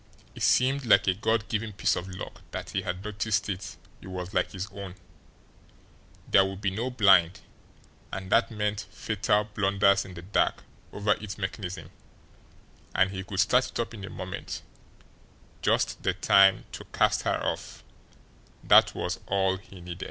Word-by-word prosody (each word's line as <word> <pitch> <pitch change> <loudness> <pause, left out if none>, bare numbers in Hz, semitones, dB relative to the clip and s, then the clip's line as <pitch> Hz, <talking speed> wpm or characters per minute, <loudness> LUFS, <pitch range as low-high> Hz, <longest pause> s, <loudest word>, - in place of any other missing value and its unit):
It - - -11
seemed 135 +2 +3
like 100 -2 +6
a 95 - +4
God 110 +3 0
given 110 -1 -2
piece 95 -3 +1
of 90 - -4
luck 90 -1 -8
that - - -6
he - - -1
had 90 +1 -4
noticed 105 0 -1
it 95 0 -5 0.2
was 90 0 -6
like - - +1
his 95 -1 -4
own; 100 -2 -8 1.3
there 95 - +6
would 95 0 -4
be 100 -1 0
no 115 +6 -2
blind, 95 -7 +4 0.7
and 95 -1 -6
that 115 - +4
meant 105 -2 -2
fatal, 105 +3 0
blunders 100 -1 +2
in 90 - -11
the 85 - -9
dark 100 +4 0 0.3
over 105 +1 0
its 105 -2 -6
mechanism, 95 -2 -5 1.0
and 95 0 +3
he 95 -1 -5
could 95 0 0
start 125 +5 +3
it - - -6
up 115 0 -2
in 105 -3 -9
a 95 - -6
moment 90 -1 -6 1.0
just - - +1
the - - +1
time 95 -1 +5
to - - -8
cast - - +1
her - - 0
off, - - -4 0.8
that - - +6
was - - -3
all 95 -1 +1
he 95 -1 -14
needed. 85 0 -8
100 Hz, 165 wpm, -27 LUFS, 95-105 Hz, 1.3 s, like